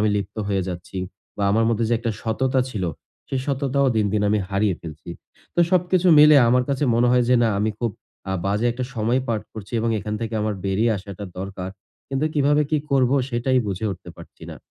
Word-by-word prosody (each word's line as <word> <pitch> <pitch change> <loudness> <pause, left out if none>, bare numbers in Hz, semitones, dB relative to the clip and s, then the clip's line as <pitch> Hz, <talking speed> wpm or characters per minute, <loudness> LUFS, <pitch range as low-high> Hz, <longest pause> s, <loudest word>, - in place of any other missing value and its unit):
আমি 105 - +3
লিপ্ত 100 +1 -4
হয়ে 95 -2 +1
যাচ্ছি। 90 +1 -6 0.4
বা 100 - -3
আমার 115 +2 +3
মধ্যে 115 0 +1
যে 120 - +2
একটা 115 - -2
সততা 130 +4 0
ছিল, 100 -6 -3 0.4
সে 135 - -2
সততাও 140 0 +1
দিন, 105 -1 +2
দিন 105 - +1
আমি 105 - +2
হারিয়ে 100 -1 +1
ফেলছি। 80 0 -9 0.4
তো - - +2
সবকিছু 185 0 +2
মিলে 150 0 +8
আমার 125 +1 +3
কাছে 140 +1 0
মনে 120 +1 +3
হয় 125 -1 +4
যে 125 - +5
না 115 - +3
আমি 110 +1 +1
খুব 120 -2 -1 0.4
আ - - 0
বাজে 105 +4 +1
একটা 125 +1 -4
সময় 115 +4 +1
পার 110 -2 0
করছি 110 -1 -10
এবং 115 0 0
এখান 105 +2 -4
থেকে 115 0 -3
আমার 105 -1 -1
বেরিয়ে 105 +4 +1
আসাটা 100 +1 -8
দরকার। 95 -1 -5 0.4
কিন্তু 135 +3 0
কিভাবে 145 +1 +3
কি 155 - +2
করব 130 -2 +3 0.2
সেটাই 130 +1 +1
বুঝে 100 +2 -2
উঠতে 90 - -11
পারছি - - -14
না। - - -8
115 Hz, 210 wpm, -23 LUFS, 100-130 Hz, 0.4 s, মিলে